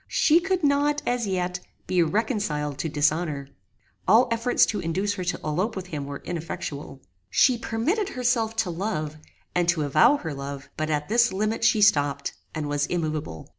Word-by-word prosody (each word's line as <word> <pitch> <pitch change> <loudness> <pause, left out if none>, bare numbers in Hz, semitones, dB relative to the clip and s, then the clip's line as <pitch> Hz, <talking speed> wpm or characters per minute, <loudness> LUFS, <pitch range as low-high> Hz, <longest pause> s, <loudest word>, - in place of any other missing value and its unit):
She 320 +2 +4
could 375 -1 -1
not, 290 +1 +2
as 245 -3 0
yet, 180 -1 -1 0.3
be 180 -1 +2
reconciled 165 - -1
to 160 - -1
dishonor. 150 -1 0 0.6
All 235 +4 +6
efforts 230 +2 +3
to 210 - -2
induce 190 +5 -1
her 190 -3 -4
to 175 - -1
elope 180 +9 -1
with 190 -2 -5
him 145 -4 -4
were 140 0 -7
ineffectual. 155 -5 -5 0.3
She 255 - +4
permitted 295 - -1
herself 240 - 0
to 225 -5 0
love, 165 -4 -3 0.4
and 175 -1 +1
to 165 -3 +2
avow 155 - +5
her 160 - -5
love; 140 0 -7
but 155 0 -2
at 150 -1 -1
this 235 +2 +3
limit 215 +4 -1
she 210 - +4
stopped, 145 -8 +2 0.2
and 155 -2 -2
was 145 0 0
immoveable. 155 - -3
180 Hz, 170 wpm, -25 LUFS, 150-225 Hz, 0.6 s, All